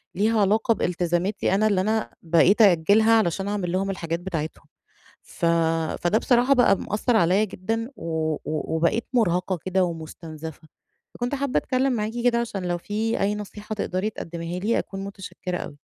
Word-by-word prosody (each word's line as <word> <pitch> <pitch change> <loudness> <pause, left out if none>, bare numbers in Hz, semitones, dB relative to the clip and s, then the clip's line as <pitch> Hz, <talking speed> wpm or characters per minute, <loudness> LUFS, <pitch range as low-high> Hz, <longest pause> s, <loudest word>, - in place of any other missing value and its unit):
ليها 215 +3 +2
علاقة 215 +3 +3
بالتزاماتي 180 +1 0
أنا 215 +2 +3
اللي 200 -3 +2
أنا 220 +3 -1
بقيت 170 +6 +4
أأجلها 205 +3 +5
علشان 195 -2 0
أعمل 200 -4 -2
لهم 190 +2 0
الحاجات 170 -3 -3
بتاعتهم. 165 -4 -5 0.6
ف - - -7 0.6
فده 175 +5 +3
بصراحة 245 +3 +3
بقى 245 -6 +4
مأثر 220 +3 0
عليَّا 195 +2 +4
جدًا، 225 +5 -3
و 160 -1 -2
و 155 +1 -3
وبقيت 170 +8 +1
مرهقة 185 -6 +1
كده 185 0 +2
ومستنزفة. 160 -1 -7 0.5
فكنت 245 +3 -2
حابة 280 -1 0
أتكلم 260 +1 0
معاكِ 215 -2 -2
كده، 240 -1 +3
عشان 205 -5 -4
لو 175 0 -1
في 215 +5 -2
أي 200 +1 +1
نصيحة 210 +1 -6
تقدّري 200 0 -2
تقدّميها 170 -2 -6
لي، 220 +5 +1
أكون 195 0 -5
متشكرة 195 -2 -6
أوي. 145 - -7
195 Hz, 160 wpm, -24 LUFS, 175-220 Hz, 0.6 s, أأجلها